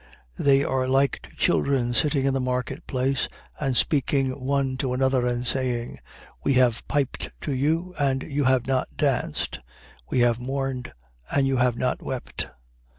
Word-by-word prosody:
7:32. - - -3
They 140 0 +5
are 130 -1 0
like 135 +1 +2
to - - -16
children 130 -3 +2
sitting 140 +2 +2
in 135 - +2
the 135 - +1
marketplace 130 +1 -1 0.3
and 135 -4 0
speaking 135 -2 +2
one 135 -1 +1
to 130 -1 -1
another 130 -1 +2
and 120 0 -1
saying: 125 -2 -2 0.4
We 140 - +3
have 125 -3 +3
piped 140 -2 -1
to 145 - -2
you, 160 +7 0
and 135 -2 +1
you 145 -1 -1
have 130 -2 +3
not 135 -1 -1
danced: - - 0 0.5
we 125 - +2
have 120 -1 +3
mourned, 130 0 -3 0.4
and 140 -1 +3
you 135 -1 +1
have 125 -1 +2
not 125 +1 -1
wept. 130 -2 -4
130 Hz, 160 wpm, -25 LUFS, 125-140 Hz, 0.5 s, They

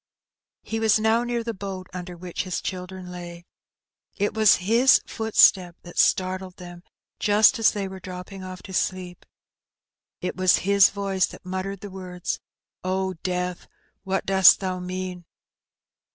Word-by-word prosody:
He 225 - -3
was 220 -1 +4
now 220 +2 +2
near 240 -1 -2
the 230 0 -3
boat 190 -2 -6
under 180 -1 -7
which 175 0 -5
his 185 -2 -3
children 185 -1 -6
lay. 175 -1 -9 0.7
It 205 +1 0
was 215 -2 +5
his 230 +8 +4
footstep 190 -5 +3
that 175 - -7
startled 185 0 +1
them 175 -1 -11 0.4
just 215 +4 +4
as 225 - +5
they 200 -2 -3
were 190 0 -9
drop 180 -1 -8
ping 195 0 -10
off 185 0 -9
to 190 - -10
sleep. 185 -1 -3 0.9
It 180 - -4
was 185 -1 +4
his 200 0 +6
voice 195 -2 0
that - - -13
muttered 190 +1 -4
the 205 - -8
words, 180 -2 -5 0.4
"Oh, 190 0 -1
Death! 180 -1 -3 0.4
what 195 -1 -2
dost 190 -1 +6
thou 185 -2 -3
mean?" 180 0 -5
185 Hz, 150 wpm, -24 LUFS, 180-200 Hz, 0.9 s, his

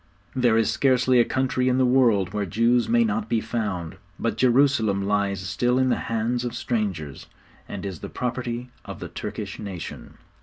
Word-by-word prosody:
There 120 -3 +3
is 110 -1 +2
scarcely 125 0 +3
a - - +7
country 130 -1 0
in 125 - +2
the 130 - +4
world 115 -7 +3
where 105 -2 -1
Jews 115 +5 +2
may 120 0 +4
not 110 0 -1
be 115 - +2
found, 95 -7 -3 0.2
but 115 -2 -1
Jerusalem 120 -4 +3
lies 100 -2 0
still 120 +6 +1
in 130 0 +3
the - - +2
hands 115 +2 0
of 120 - -4
strangers, 95 - -3 0.4
and - - -6
is 95 -5 -5
the - - -7
property 125 0 -4
of - - -8
the - - -7
Turkish - - -6
nation. 95 -5 -7
115 Hz, 180 wpm, -24 LUFS, 100-125 Hz, 0.4 s, a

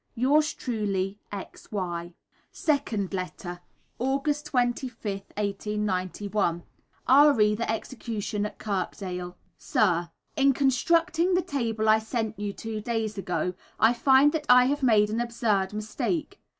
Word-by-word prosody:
Yours 295 +6 +2
truly, 205 -4 -2
X. 200 -2 -9
Y. 175 -4 -4 0.4
(Second 235 - -1
letter.) 180 -1 -5 0.4
August 285 +4 -1
25th, 240 -5 -2
1891. 200 -3 -1 0.4
Re 260 -6 +6
the 220 +1 -1
Execution 220 -3 -3
at - - -13
Kirkdale. 180 -3 -4 0.2
Sir, 175 -5 +1 0.3
In 275 -1 +4
constructing 330 +7 +2
the 360 - +2
table 230 -9 -1
I 215 0 +6
sent 220 -1 -3
you 205 -1 -2
two 220 +1 -5
days 225 -1 -2
ago, 180 -1 -2 0.3
I 225 +2 +5
find 265 +4 +5
that 305 -1 -3
I 250 0 +8
have 285 +3 0
made 215 -5 +4
an 225 +2 0
absurd 220 -5 0
mistake. 265 - -3
220 Hz, 125 wpm, -27 LUFS, 200-265 Hz, 0.4 s, I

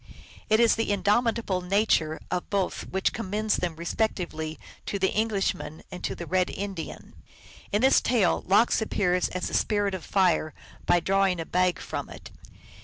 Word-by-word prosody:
It 220 0 +4
is 235 -1 +5
the 225 - 0
indomitable 205 0 +1
nature 180 -4 +1
of 180 -1 -2
both 195 -2 -1
which 190 0 0
commends 215 0 -1
them 175 -3 -2
respectively 170 -3 -2 0.3
to 200 - -1
the 190 -1 +1
Englishman 200 -8 -1
and 180 - -8
to - - -2
the 170 - -6
Red 185 +1 +1
Indian. 195 -4 -6 0.6
In 210 +4 +1
this 265 - +5
tale 230 -7 +2
Lox 215 +5 +4
appears 180 -4 +1
as 185 - -3
the - - -7
spirit 205 -2 +1
of 185 - -5
fire 180 -6 +1 0.3
by 175 - +4
drawing 195 0 +2
a 165 - -3
bag 180 0 +1
from - - -5
it. - - -11
190 Hz, 165 wpm, -26 LUFS, 180-210 Hz, 0.6 s, is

